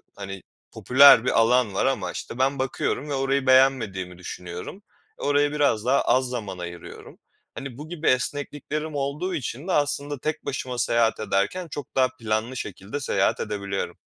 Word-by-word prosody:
hani, 95 -1 -7 0.3
popüler 130 -2 +7
bir - - +3
alan 115 -2 +3
var - - +1
ama - - 0
işte 120 - -7
ben 135 +1 +1
bakıyorum 135 +2 -2
ve - - -2
orayı 135 0 0
beğenmediğimi 115 -9 +3
düşünüyorum. 90 - -8 0.4
E, - - -8
oraya 145 0 +2
biraz 140 -7 +1
daha 135 +2 +3
az 130 +1 +2
zaman 105 -7 -5
ayırıyorum. 85 -1 -9 0.4
Hani, 135 -3 -7
bu 150 +2 -9
gibi 165 -2 -4
esnekliklerim 145 +3 -1
olduğu 145 +7 -2
için 140 +2 -5
de 190 - -1
aslında 145 -1 0
tek 155 +3 -3
başıma 130 -2 -4
seyahat 115 -1 +2
ederken 110 - -1
çok 145 -4 -8
daha 130 -1 +4
planlı 110 +3 -2
şekilde 105 +7 -6
seyahat - - +1
edebiliyorum. 100 -1 -3
130 Hz, 160 wpm, -25 LUFS, 110-145 Hz, 0.4 s, popüler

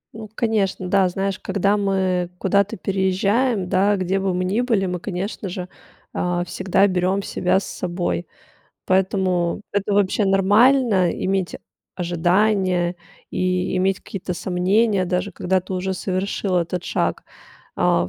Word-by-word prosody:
Ну, 220 -2 -8
конечно, 205 -5 0
да, 190 -1 +3
знаешь, 195 +2 -2
когда 200 +1 +1
мы 190 -3 0
куда-то 200 +2 +1
переезжаем, 195 +3 +1
да, 200 +2 +3
где 185 +1 0
бы 195 -1 0
мы 180 - -1
ни 205 +6 +1
были, 225 -6 +1
мы, 180 -1 -3
конечно 195 +1 -4
же, 180 0 -5 0.5
а, 175 0 -1
всегда 190 +2 +1
берем 190 +1 +1
себя 190 0 +1
с - - -8
собой. 175 -1 -3 0.6
Поэтому 185 -2 +1
это 205 0 0
вообще 200 +1 +2
нормально 200 0 +4
иметь 190 -1 -1 0.4
ожидания 180 +1 +1 0.3
и 185 0 0
иметь 190 +1 +1
какие-то 185 -2 -5
сомнения, 190 +3 +1
даже 180 +3 -2
когда 185 +1 0
ты 185 +1 -6
уже 190 +1 -2
совершил 185 0 -2
этот 175 +1 -1
шаг. - - -1 0.5
А, 85 0 +2
190 Hz, 135 wpm, -22 LUFS, 180-200 Hz, 0.6 s, нормально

